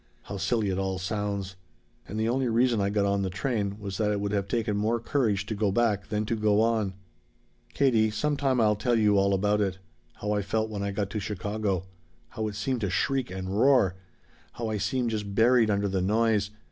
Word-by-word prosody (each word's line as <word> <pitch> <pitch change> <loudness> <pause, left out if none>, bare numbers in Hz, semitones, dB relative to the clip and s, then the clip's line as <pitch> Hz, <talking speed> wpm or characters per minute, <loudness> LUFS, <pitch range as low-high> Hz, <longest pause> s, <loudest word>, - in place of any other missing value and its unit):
How 100 - -6
silly 110 +1 0
it 95 - -1
all 95 -1 -1
sounds! 100 0 -3 0.5
"And 105 - -4
the 110 - +1
only 130 +2 +1
reason 120 -1 +2
I 100 - +1
got 100 0 +1
on 100 0 +1
the 95 - -1
train 100 0 -2
was 100 -3 -6
that 105 -1 +2
it 105 -1 0
would 100 0 -2
have 100 -2 -1
taken 110 -1 -1
more 110 +3 +1
courage 110 -5 0
to 110 - -3
go 105 -1 0
back 105 -2 +1
than 105 0 -1
to 115 - -1
go 105 -1 +2
on. 110 -4 +1 0.8
"Katie, 115 -6 +3
some 145 +8 -1
time 135 -3 +1
I'll 105 -2 +4
tell 120 +3 +1
you 105 -2 +4
all 100 0 +2
about 105 +2 +2
it. 95 -2 -1 0.4
How 105 - -3
I 105 -1 +1
felt 110 +2 -1
when 100 -2 -4
I 100 - -1
got 100 0 -3
to 110 - -2
Chicago. 100 -1 -2 0.4
How 110 -1 -3
it 105 - -5
seemed 120 +3 -2
to 100 - 0
shriek 135 +6 0
and 95 +1 -4
roar. 125 -8 +4 0.6
How 115 -2 -4
I 110 -1 -2
seemed 125 +2 0
just 105 -2 -4
buried 115 0 +4
under 100 0 +1
the 95 -1 -1
noise. 105 +1 +2
105 Hz, 220 wpm, -27 LUFS, 100-115 Hz, 0.8 s, I'll